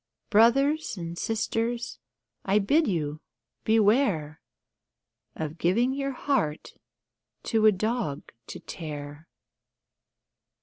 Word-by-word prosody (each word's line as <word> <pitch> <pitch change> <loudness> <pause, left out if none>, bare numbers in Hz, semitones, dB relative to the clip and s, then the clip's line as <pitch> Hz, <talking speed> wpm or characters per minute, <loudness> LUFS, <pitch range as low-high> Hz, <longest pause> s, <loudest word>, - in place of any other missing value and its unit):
Brothers 275 +6 +3
and 170 -1 -5
Sisters, 230 +4 -2 0.4
I 195 +1 +2
bid 285 +11 +3
you 155 -5 -2 0.4
beware 205 - +2 0.9
Of 160 +1 -5
giving 235 +9 +2
your 275 0 -2
heart 205 - -1 0.7
to 220 -1 +3
a - - +8
dog 215 - -2 0.2
to - - -7
tear. 150 -1 -8
210 Hz, 90 wpm, -27 LUFS, 160-240 Hz, 0.9 s, a